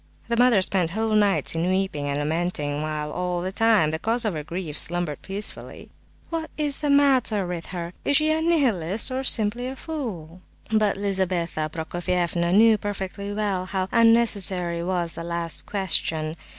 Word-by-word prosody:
The 235 Hz, -, +1 dB
mother 235 Hz, -5 st, +4 dB
spent 185 Hz, -3 st, 0 dB
whole 220 Hz, +4 st, -1 dB
nights 205 Hz, -2 st, +2 dB
in 165 Hz, +2 st, -1 dB
weeping 185 Hz, -6 st, -1 dB
and 140 Hz, -, -1 dB
lamenting, 150 Hz, -1 st, -2 dB
while 150 Hz, -1 st, -3 dB
all 180 Hz, 0 st, -2 dB
the 185 Hz, -, -3 dB
time 215 Hz, -7 st, +3 dB
the 160 Hz, -, -3 dB
cause 230 Hz, +5 st, 0 dB
of 210 Hz, -, 0 dB
her 155 Hz, -2 st, -4 dB
grief 165 Hz, -1 st, -5 dB
slumbered 175 Hz, -2 st, 0 dB
peacefully. 200 Hz, +2 st, -6 dB, 0.4 s
"What 325 Hz, -1 st, -3 dB
is 295 Hz, -2 st, 0 dB
the 295 Hz, -, -2 dB
matter 265 Hz, -8 st, +3 dB
with 175 Hz, -2 st, -5 dB
her? 175 Hz, -1 st, -5 dB
Is 285 Hz, -, +3 dB
she 310 Hz, 0 st, +2 dB
a 315 Hz, 0 st, +1 dB
Nihilist, 240 Hz, -, +1 dB
or 260 Hz, +1 st, -2 dB
simply 235 Hz, 0 st, +3 dB
a 260 Hz, -, -5 dB
fool?" 200 Hz, -, -6 dB, 0.3 s
But 215 Hz, -3 st, +2 dB
Lizabetha 185 Hz, -5 st, -1 dB
Prokofievna 170 Hz, +1 st, -1 dB
knew 215 Hz, +2 st, +5 dB
perfectly 200 Hz, 0 st, -5 dB
well 200 Hz, -3 st, -2 dB
how 190 Hz, -1 st, -2 dB
unnecessary 200 Hz, -7 st, +3 dB
was 175 Hz, -2 st, -1 dB
the 165 Hz, -, -6 dB
last 170 Hz, -1 st, -3 dB
question. 165 Hz, -5 st, +1 dB
190 Hz, 165 wpm, -24 LUFS, 170-225 Hz, 0.4 s, knew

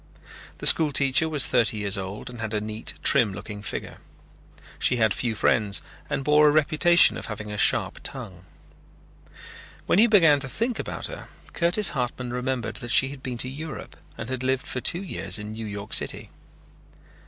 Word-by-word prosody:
The -, -, -7 dB
school 155 Hz, -3 st, +6 dB
teacher 140 Hz, +3 st, +2 dB
was 145 Hz, -3 st, +3 dB
thirty 110 Hz, -3 st, +1 dB
years 100 Hz, -1 st, -2 dB
old 95 Hz, +4 st, -6 dB
and 120 Hz, -2 st, -9 dB
had 110 Hz, -1 st, -4 dB
a -, -, 0 dB
neat 110 Hz, +1 st, -5 dB
trim 105 Hz, -5 st, +4 dB
looking 105 Hz, +2 st, -8 dB
figure. 105 Hz, -, -6 dB, 0.8 s
She 125 Hz, -, +1 dB
had 110 Hz, -4 st, +2 dB
few 115 Hz, -3 st, -2 dB
friends 105 Hz, -2 st, +1 dB, 0.3 s
and 135 Hz, -, -2 dB
bore 150 Hz, +1 st, +4 dB
a -, -, +5 dB
reputation 155 Hz, +3 st, +4 dB
of -, -, -6 dB
having 105 Hz, -1 st, -7 dB
a 105 Hz, -, -5 dB
sharp -, -, +3 dB
tongue. 95 Hz, -1 st, -6 dB, 1.4 s
When 180 Hz, -, +2 dB
he 230 Hz, -, +6 dB
began 165 Hz, -10 st, +5 dB
to 135 Hz, -1 st, -1 dB
think 230 Hz, -, -2 dB
about -, -, -5 dB
her, -, -, -6 dB, 0.3 s
Curtis 175 Hz, +3 st, +2 dB
Hartman 125 Hz, -1 st, -4 dB
remembered 125 Hz, -2 st, -3 dB
that 120 Hz, -1 st, -8 dB
she 135 Hz, +3 st, +4 dB
had 140 Hz, -1 st, -10 dB
been 125 Hz, -2 st, -5 dB
to 125 Hz, -, -2 dB
Europe 150 Hz, +4 st, -8 dB, 0.2 s
and 110 Hz, -, -6 dB
had 130 Hz, 0 st, -4 dB
lived 130 Hz, 0 st, -1 dB
for 130 Hz, -, -4 dB
two 175 Hz, +9 st, 0 dB
years 100 Hz, -, -2 dB
in 105 Hz, 0 st, -7 dB
New 110 Hz, 0 st, -7 dB
York 100 Hz, 0 st, -6 dB
City. -, -, +1 dB
125 Hz, 185 wpm, -24 LUFS, 110-150 Hz, 1.4 s, school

